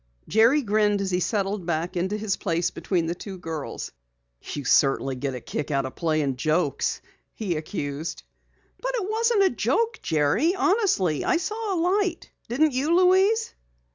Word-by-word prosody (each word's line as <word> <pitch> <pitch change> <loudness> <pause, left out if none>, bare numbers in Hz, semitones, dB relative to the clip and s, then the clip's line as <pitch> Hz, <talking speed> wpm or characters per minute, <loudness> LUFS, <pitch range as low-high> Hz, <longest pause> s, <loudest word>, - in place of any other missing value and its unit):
Jerry 235 +7 +4
grinned 210 -1 +2
as 195 -1 -2
he 180 - +1
settled 195 -1 -1
back 170 +2 -2
into 190 +4 -1
his 210 -2 -1
place 170 -2 -1
between 175 -4 -1
the 165 - -1
two 190 +2 -8
girls. 160 -4 -5 0.5
"You 145 -2 -6
certainly 135 0 +3
get 135 +1 -3
a - - -5
kick 150 - -4
out 140 -2 0
of 130 - -6
playing 155 -5 0
jokes," 155 0 0 0.3
he 195 -6 -2
accused. 155 -1 -4 0.6
"But - - -2
it 420 -6 -2
wasn't 445 -1 +2
a 380 - +3
joke, 460 0 0
Jerry. 160 - +2
Honestly, 375 - +1
I 365 - +2
saw 425 +3 -2
a - - -1
light. 365 0 0 0.2
Didn't 290 +5 +2
you, 290 +6 +1
Louise?" 380 +5 +3
200 Hz, 165 wpm, -25 LUFS, -, 0.6 s, Jerry